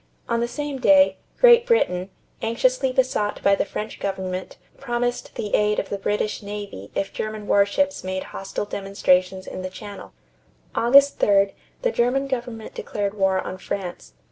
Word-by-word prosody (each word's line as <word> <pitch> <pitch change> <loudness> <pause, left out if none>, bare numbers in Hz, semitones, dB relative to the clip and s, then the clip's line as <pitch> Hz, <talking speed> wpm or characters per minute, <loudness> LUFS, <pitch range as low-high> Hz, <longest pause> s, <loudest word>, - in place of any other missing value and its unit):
On 235 - 0
the 235 - 0
same 290 +2 -4
day, 285 +2 +5 0.2
Great 480 -1 +7
Britain, 185 - +2 0.3
anxiously 265 - +1
besought 255 -5 0
by 200 - +5
the 200 - +1
French 215 +2 -6
government, 185 -1 -4 0.2
promised 245 -2 -2
the 205 - -4
aid 210 0 +3
of 195 - -2
the 200 - -3
British 210 +2 -1
navy 205 - -7
if 195 - -2
German 215 -1 -4
warships 205 +9 +2
made 185 0 -3
hostile 195 +1 -4
demonstrations 190 -2 +1
in - - -6
the 185 - -4
Channel. 205 +2 -10 0.6
August 275 +4 +5
3d, 200 -1 +4 0.3
the - - +2
German 255 - +1
government 240 -4 -4
declared 200 -1 -3
war 190 -2 +1
on 185 - -6
France. 180 - -5
210 Hz, 155 wpm, -23 LUFS, 195-250 Hz, 0.6 s, Great